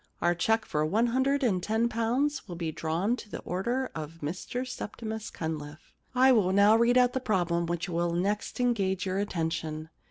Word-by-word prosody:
Our 175 +1 +3
cheque 220 +5 +1
for 150 0 0
one 210 +10 +2
hundred 265 +4 +1
and 195 -7 +2
ten 220 +5 +1
pounds 245 +5 0
will 175 - -6
be 165 -2 -3
drawn 165 +9 0
to 210 - -10
the - - -5
order 240 +9 -2
of 155 +1 -6
Mr 185 - -4
Septimus 220 -2 -5
Cunliffe. 155 -1 -6
* - - -35
I 265 - +8
will 205 -7 +4
now 200 +2 +6
read 235 +2 +4
out 250 0 +4
the 260 - 0
problem 175 -7 0
which 170 0 -2
will 170 -1 0
next 200 +7 -1
engage 195 -7 +1
your 190 +1 -1
attention. 160 -4 -3
200 Hz, 190 wpm, -29 LUFS, 170-235 Hz, -, I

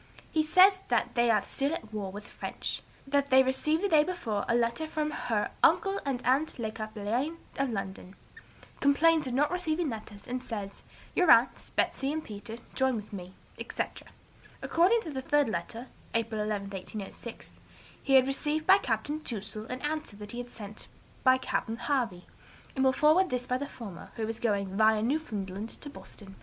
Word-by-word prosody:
He 315 - +3
says 370 +5 +6
that - - +1
they 240 0 +3
are 215 -3 +4
still 280 +3 0
at 220 -8 -9
war 200 -3 -3
with 205 +2 -7
the - - -16
French; - - -4 0.2
that 280 0 +1
they 265 0 +7
received 305 +6 +1
the - - +3
day 310 -5 +5
before 300 - -2
a 235 - +3
letter 235 +6 +1
from 305 -1 -1
her 225 -7 -1
'uncle 395 -1 +4
and 265 -3 -2
aunt 275 +5 +2
Le 220 -3 -2
Cappelain 215 +8 -2 0.2
of 275 -1 +1
London;' 195 -3 -5 0.6
complains 305 +2 +4
of 250 - -2
not 295 +4 +3
receiving 345 -3 0
letters, 210 -2 -8
and 250 +1 -3
says, 205 -5 -6 0.3
'Your 360 -3 +3
aunts, 235 -1 +5
Betsey 270 +1 0
and 315 +1 -2
Peter 220 +2 -8 0.2
join 265 -1 +2
with 210 -1 -7
me,' 185 -1 -7 0.2
etc. - - -4 0.6
According 380 +8 +4
to 320 - -6
the 265 -2 -3
third 290 +1 +3
letter 220 +5 -4 0.3
(April 225 -1 0
11, 205 -2 -2
1806), 200 +4 -8 0.4
he 275 - 0
had 260 -1 +7
received 295 +3 0
by 385 +1 +7
Capt. 225 - -1 0.2
Touzel 215 -1 -5
an 255 +1 -5
answer 310 +1 -2
to - - -12
that 205 0 -8
he 245 +1 -4
sent 215 -3 -8 0.4
by 260 0 +6
Capt. 260 - -2
Harvey, 235 -11 -1 0.5
and 265 - +1
will 265 - +5
forward 310 +7 +4
this 250 0 -1
by 250 0 0
the 285 - -3
former, 205 -11 -9
who 220 -1 -2
is 225 +1 -4
going 200 -5 0
via 220 0 +4
Newfoundland 220 -7 -2
to 290 - -9
Boston. 195 -7 -10
250 Hz, 185 wpm, -30 LUFS, 215-295 Hz, 0.6 s, they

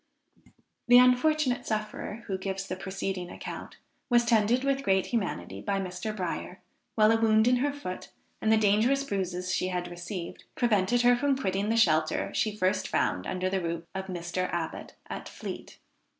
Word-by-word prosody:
The 245 0 +8
unfortunate 250 +1 +3
sufferer 215 +1 -4
who 195 - -2
gives 195 0 -3
the 185 - -3
preceding 190 -1 -4
account, - - -8 0.3
was 240 -1 +4
tended 230 +2 +3
with 275 0 +1
great 190 -6 +2
humanity 100 - -3
by 195 - -1
Mr. 185 +3 -4
Bryer, 180 0 -4 0.4
while 215 0 +5
a 225 0 +2
wound 220 0 +4
in 250 0 +4
her 285 +3 +1
foot, 280 -11 -7 0.3
and 220 - +2
the 220 - +6
dangerous 220 +6 +3
bruises 185 -6 -2
she 185 - 0
had 180 -1 -2
received, 175 0 -7
prevented 235 0 +2
her 245 0 +6
from 275 +2 +1
quitting 200 -3 -1
the 225 - +2
shelter 155 -7 +2
she 215 -1 0
first 185 0 +1
found 90 - 0
under 185 0 -1
the 190 0 0
roof 170 -1 -3
of 190 0 -4
Mr. 180 0 -3
Abbot, 170 -2 -4
at - - -6
Fleet. - - -8
200 Hz, 170 wpm, -28 LUFS, 185-240 Hz, 0.4 s, The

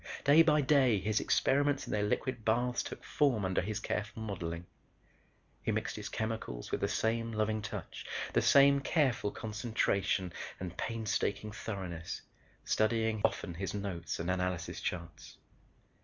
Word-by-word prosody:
Day 145 +3 +7
by 150 -2 +5
day 130 -6 +4
his 105 +2 +1
experiments 145 +1 +2
in - - -4
their 105 - +1
liquid 115 +3 -1
baths 120 +3 +1
took - - -7
form 125 -9 +2
under 95 0 +1
his 105 +3 -3
careful 110 +1 -3
modeling. 85 -5 -4 1.0
He - - 0
mixed - - -2
his - - -5
chemicals 110 - -4
with - - -1
the - - +2
same 115 +1 0
loving 110 0 0
touch, 105 - -6 0.3
the - - +4
same 140 0 +6
careful 135 -7 +1
concentration 105 -5 -1 0.3
and 90 -1 -5
painstaking 105 -2 -1
thoroughness, 95 -6 -5 0.4
studying 110 0 +1
often 90 - 0
his 95 +4 -4
notes 95 -4 -3
and 85 +2 -1
analysis 90 -3 -2
charts. 85 -2 -5
110 Hz, 140 wpm, -33 LUFS, 95-120 Hz, 1.0 s, Day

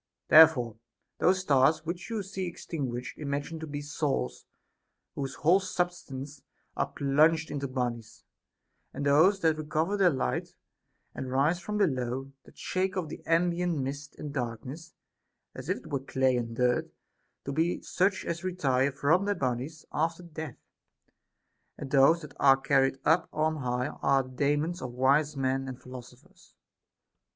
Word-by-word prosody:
There 160 +1 +11
fore 120 -8 -5 0.4
those 185 +1 +3
stars 155 0 +3
which 170 +5 -5
you 220 -3 -2
see 190 -1 -4
extinguished 135 -8 -5
imagine 145 +2 -3
to 160 - -6
be 145 0 -5
souls 135 - -2 0.7
whose 135 -1 -4
whole 175 +5 +4
substances 170 -7 -4 0.3
are - - 0
plunged 155 +3 +2
into 140 -1 -3
bodies; 120 -4 -4 0.7
and 145 - -3
those 160 +8 +4
that 160 -2 +2
recover 155 +6 -1
their 190 -3 +5
light 130 - -2 0.6
and 130 - -5
rise 145 +6 +2
from 210 +3 -4
below, 135 -7 -1
that - - -18
shake 190 +1 -1
off 170 -4 -2
the - - -8
ambient 170 0 +1
mist 140 +1 -5
and 145 -2 -6
darkness, 130 +5 -5 0.6
as - - -8
if - - +1
it - - -13
were 140 - 0
clay 130 -1 +1
and 115 -1 -3
dirt, 125 0 +1 0.6
to 140 - -3
be 160 +5 0
such 190 +2 0
as 170 +1 -3
retire 140 -7 +1
from 155 +8 +2
their 205 0 0
bodies 135 +4 -3
after 165 +3 -1
death; 160 -5 -7 1.2
and 135 - -7
those 145 +5 +5
that 150 - -10
are 135 -1 +6
carried 135 0 +2
up 160 +2 +3
on 155 +1 0
high 125 -1 -1
are 135 0 +3
the 130 - -12
Daemons 145 +6 0
of 125 -2 -5
wise 140 +4 +2
men 135 0 0
and 130 -1 -7
philosophers. 125 -1 -13
145 Hz, 155 wpm, -29 LUFS, 130-165 Hz, 1.2 s, There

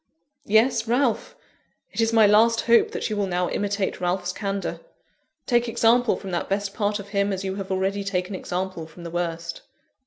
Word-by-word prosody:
"Yes, 225 +2 +3
Ralph. 245 0 0 0.6
It - - -1
is 225 0 +2
my 225 -2 +6
last 225 +3 +5
hope 235 -1 +4
that - - -3
you - - 0
will 205 -1 0
now 180 -1 -1
imitate 200 -2 -2
Ralph's 180 0 -1
candour. 200 0 -3 0.7
Take 240 -1 +2
example 235 +1 +3
from 195 - -7
that 175 - -2
best 200 0 -1
part 205 -1 0
of 200 -1 -9
him, 200 0 +1
as 190 0 -3
you 190 -1 -2
have 195 -1 -5
already 195 +1 -1
taken 190 0 -2
example 185 -2 -4
from 170 +2 -13
the 170 - -7
worst." 170 -1 -3
200 Hz, 185 wpm, -24 LUFS, 185-220 Hz, 0.7 s, my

